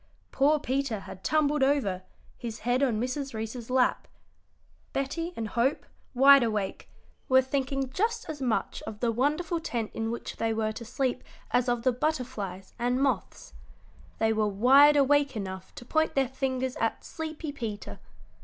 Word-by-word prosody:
Poor 290 +3 +3
Peter 260 -6 -1
had 190 - -11
tumbled 300 -1 +2
over, 265 -10 +2 0.3
his 230 -2 -7
head 245 +3 +1
on 240 -6 +2
Mrs. 255 +1 -3
Reece's 225 +2 -5
lap. 255 0 +2 0.9
Betty 330 +5 -2
and 225 -2 -4
Hope, 240 +6 0 0.3
wide 275 +2 +8
awake, 215 -4 -2 0.4
were 260 0 +6
thinking 270 0 -1
just 445 - -1
as 295 -3 -6
much 245 -4 -1
of 210 - -6
the 235 0 +1
wonderful 300 +8 0
tent 235 -9 -3
in 225 0 -2
which 235 - -5
they 225 -1 0
were 215 -1 0
to 230 +2 -8
sleep 255 +2 -1 0.3
as 250 0 +2
of 240 -1 0
the 255 - +4
butterflies 240 - -3
and 245 +2 +1
moths. 275 0 -2 0.6
They 220 0 +2
were 215 -1 +1
wide 265 +9 +6
awake 285 -1 +3
enough 190 -2 -6
to 240 - -9
point 315 +5 +1
their 270 -1 +3
fingers 260 -1 -2
at 225 - -1
sleepy 315 -1 -5
Peter. 215 - -6
255 Hz, 160 wpm, -28 LUFS, 225-280 Hz, 0.9 s, wide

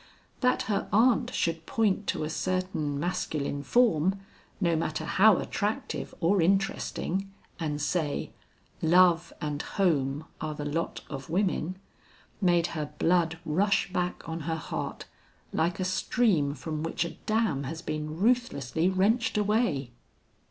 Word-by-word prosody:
That 250 0 +2
her 215 -5 -1
aunt 245 +3 +4
should 165 -6 -1
point 210 -2 +1
to 160 -4 -1
a 155 - -2
certain 185 -5 -1
masculine 145 -4 -2
form, 190 - +3 0.4
no 170 -4 +2
matter 155 0 -2
how 200 +3 +5
attractive 210 +1 -2
or 185 +2 +3
interesting, 195 +1 0 0.3
and 150 -3 -2
say, 150 0 -1 0.5
"Love 175 0 +4
and 150 -1 -2
home 150 -6 0 0.2
are 155 -1 -3
the 145 - -5
lot 160 +3 -2
of 135 -1 -7
women," 185 -1 0 0.6
made 175 -3 +4
her 150 -3 -4
blood 165 -2 +2
rush 190 +4 +1
back 180 -1 -2
on 165 0 -3
her 160 +1 -2
heart, 160 - -5 0.5
like 170 +4 0
a 185 - 0
stream 185 - +1
from 155 +2 -4
which 165 +1 -1
a 170 - -4 0.2
dam 215 -11 +1
has 160 +4 -5
been 155 0 -4
ruthlessly 185 - +1
wrenched 210 +5 +2
away. 210 - +1
170 Hz, 135 wpm, -28 LUFS, 155-195 Hz, 0.6 s, how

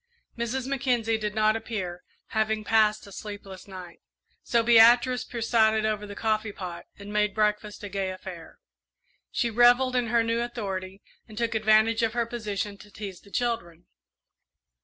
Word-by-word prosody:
Mrs. 240 +2 -2
Mackenzie 245 -4 0
did 210 -1 -3
not 215 0 +3
appear, 195 -6 -4 0.3
having 220 -1 0
passed 215 0 +2
a 200 - -13
sleepless 200 -1 -9
night; 185 -3 -10 0.4
so 235 -1 +1
Beatrice 240 +2 +6
presided 220 -2 +2
over 210 -1 -1
the 205 - -8
coffee 215 -1 -1
pot 175 -3 -7
and 205 +1 -9
made 210 -1 +1
breakfast 210 -1 -1
a - - -4
gay 195 -1 -2
affair. 185 -3 -9 0.7
She 235 -2 -1
revelled 245 +3 +5
in 245 -1 +1
her 230 0 +2
new 230 +1 0
authority, 195 -5 -5 0.2
and 215 -2 -13
took 235 0 0
advantage 220 +1 +3
of 225 -1 +1
her 235 -1 0
position 210 -3 -4
to 210 - -14
tease 200 -3 -8
the 200 - -18
children. 215 -8 -3
215 Hz, 160 wpm, -27 LUFS, 200-230 Hz, 0.7 s, Beatrice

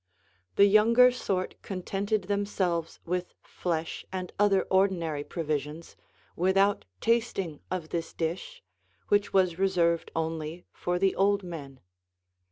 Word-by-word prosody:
The 200 - +7
younger 230 +5 +6
sort 195 -7 -3
contented 200 +2 -2
themselves 190 -4 -1
with 180 +1 -3
flesh 165 -2 -3
and 185 -1 -5
other 200 -2 +4
ordinary 175 -6 +1
provisions, 155 0 -4 0.4
without 195 +3 +2 0.2
tasting 220 -9 0
of 175 -4 -4
this 165 -1 -3
dish, 190 - -4 0.5
which 205 0 +2
was 185 -3 +2
reserved 175 -3 +2
only 160 +1 -3
for 175 0 -1
the 190 +1 +2
old 200 0 +2
men. 145 -7 -8
185 Hz, 115 wpm, -28 LUFS, 165-200 Hz, 0.5 s, The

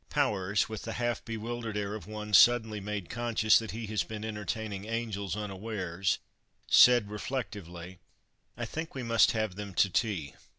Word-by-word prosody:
Powers, 100 0 +1
with 110 -1 -6
the 115 - -5
half 120 0 -1
bewildered 115 -1 -4
air 100 0 -2
of 110 - -7
one 105 0 -6
suddenly 110 -2 +6
made 100 -2 -4
conscious 115 -2 +3
that 110 -2 -6
he 115 +1 -5
had 105 -1 -1
been 110 0 -5
entertaining 105 -1 -4
angels 110 -5 -3
unawares, 95 -3 -2 0.5
said, 120 -4 +6
reflectively, 95 -7 -5 0.6
"I - - -3
think 160 -1 -6
we 130 - -4
must 115 -1 +4
have 110 -4 -1
them 100 -1 -7
to 100 - +3
tea." 90 - -1
105 Hz, 160 wpm, -30 LUFS, 100-115 Hz, 0.6 s, suddenly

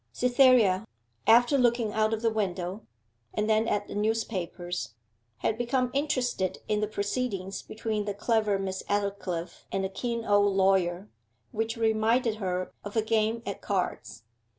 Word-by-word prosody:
Cytherea, 245 -6 +4 0.4
after 245 +5 +6
looking 235 -3 +2
out 215 0 +2
of 225 0 -2
the 225 - +3
window, 190 -1 -3 0.5
and 210 0 0
then 220 +1 +3
at 205 -2 0
the - - -7
newspapers, 190 - -2 0.4
had 220 - -1
become 245 +1 0
interested 250 -10 0
in 210 -1 +1
the 210 - 0
proceedings 200 -2 -3
between 215 -1 -3
the 205 -1 -3
clever 215 -1 +1
Miss 190 -1 -3
Aldclyffe 200 -4 -3
and 195 - -1
the 190 - -1
keen 235 +3 -3
old 205 -1 +3
lawyer, 190 0 +2 0.4
which 225 +1 -2
reminded 225 +1 +2
her 185 -3 -2
of 205 +1 -7
a 220 - +3
game 225 +1 +1
at 200 - -5
cards. 185 - -3
215 Hz, 150 wpm, -28 LUFS, 195-230 Hz, 0.5 s, after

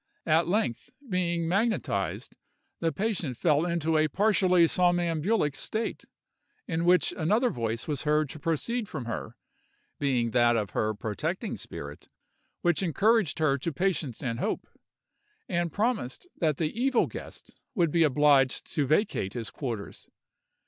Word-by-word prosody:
At 160 +1 +3
length, 175 - -1 0.2
being 175 -4 0
magnetized, 215 +6 -1 0.4
the 165 -1 0
patient 190 - -2
fell 155 +2 +2
into 165 -2 +1
a 155 - +3
partially 185 -1 +3
somnambulic 175 -1 +1
state, 220 +1 -3 0.6
in 165 0 -1
which 180 +1 +4
another 215 +10 +2
voice 115 -1 -3
was 145 -4 -1
heard 150 0 +2
to 155 - -8
proceed 205 - -1
from 140 -6 -5
her, 115 - -5 0.6
being 125 -5 +1
that 120 -1 +4
of 105 -3 -2
her 110 0 0
protecting 105 -1 -3
spirit, 70 0 -9 0.5
which 175 0 +2
encouraged 195 +1 +2
her 140 -3 +2
to 165 +6 -2
patience 160 - -1
and 115 -3 -2
hope, - - -2 0.8
and 175 -2 -1
promised 210 - -1
that 155 -4 0
the 160 -2 -1
evil 255 +1 +2
guest - - -10 0.2
would 170 -6 +2
be 170 - +2
obliged 145 -3 +4
to 145 -3 +1
vacate 155 - +1
his 115 -3 -3
quarters. 115 -8 -6
160 Hz, 140 wpm, -28 LUFS, 135-180 Hz, 0.8 s, which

